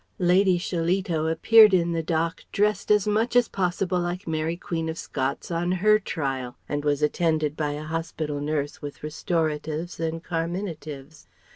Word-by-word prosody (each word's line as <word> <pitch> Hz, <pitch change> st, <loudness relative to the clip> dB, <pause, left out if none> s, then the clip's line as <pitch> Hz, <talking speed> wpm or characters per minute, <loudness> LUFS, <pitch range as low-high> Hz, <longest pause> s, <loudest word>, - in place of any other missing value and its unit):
Lady 180 Hz, +1 st, +4 dB
Shillito 175 Hz, -1 st, -1 dB
appeared 215 Hz, +5 st, +7 dB
in 170 Hz, -1 st, +1 dB
the 165 Hz, -1 st, 0 dB
dock 165 Hz, +1 st, -1 dB
dressed 210 Hz, +1 st, +1 dB
as 210 Hz, -1 st, +4 dB
much 220 Hz, +4 st, +1 dB
as 245 Hz, -1 st, +5 dB
possible 180 Hz, 0 st, -1 dB
like 175 Hz, +2 st, -3 dB
Mary, 160 Hz, +1 st, -1 dB
Queen 165 Hz, -2 st, -3 dB
of 160 Hz, -, -4 dB
Scots 135 Hz, +2 st, -3 dB
on 175 Hz, +2 st, 0 dB
her 215 Hz, +4 st, +4 dB
trial; 135 Hz, -, -3 dB
and 145 Hz, 0 st, -2 dB
was 145 Hz, 0 st, +1 dB
attended 155 Hz, -1 st, +1 dB
by 150 Hz, -2 st, -1 dB
a 150 Hz, +1 st, -5 dB
hospital 155 Hz, -2 st, -3 dB
nurse 145 Hz, -1 st, -2 dB
with 145 Hz, 0 st, -8 dB
restoratives 155 Hz, +1 st, -2 dB
and 165 Hz, 0 st, -3 dB
carminatives. 165 Hz, -4 st, -5 dB
165 Hz, 155 wpm, -25 LUFS, 155-180 Hz, -, appeared